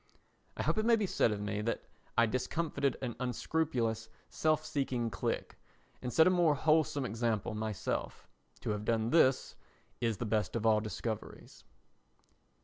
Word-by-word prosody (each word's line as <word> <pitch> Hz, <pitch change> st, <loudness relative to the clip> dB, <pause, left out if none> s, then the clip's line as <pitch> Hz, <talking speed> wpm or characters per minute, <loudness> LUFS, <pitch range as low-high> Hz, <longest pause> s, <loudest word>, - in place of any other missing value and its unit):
I -, -, -1 dB
hope -, -, +1 dB
it 215 Hz, -, +1 dB
may 235 Hz, -, +7 dB
be 215 Hz, -2 st, 0 dB
said 120 Hz, -, +2 dB
of 105 Hz, -, -2 dB
me 105 Hz, 0 st, -2 dB
that 115 Hz, +2 st, -2 dB, 0.3 s
I 115 Hz, -, +6 dB
discomfited 140 Hz, +3 st, -1 dB
an 120 Hz, -3 st, -3 dB
unscrupulous, 125 Hz, -3 st, -1 dB, 0.2 s
self 155 Hz, 0 st, +1 dB
seeking 125 Hz, -6 st, -1 dB
clique, 95 Hz, -, -3 dB, 0.4 s
and 125 Hz, -, -3 dB
set 160 Hz, -, +6 dB
a 185 Hz, -, +5 dB
more 170 Hz, -4 st, +4 dB
wholesome 155 Hz, -2 st, +2 dB
example 115 Hz, -1 st, -1 dB
myself. 110 Hz, -2 st, -3 dB, 0.3 s
To -, -, -2 dB
have 105 Hz, 0 st, -3 dB
done 115 Hz, 0 st, 0 dB
this 135 Hz, -5 st, +3 dB, 0.4 s
is 115 Hz, -3 st, 0 dB
the 120 Hz, -, -3 dB
best 110 Hz, 0 st, 0 dB
of 115 Hz, -1 st, -1 dB
all 110 Hz, -1 st, +5 dB
discoveries. 110 Hz, +1 st, -6 dB
120 Hz, 155 wpm, -33 LUFS, 110-155 Hz, 0.4 s, may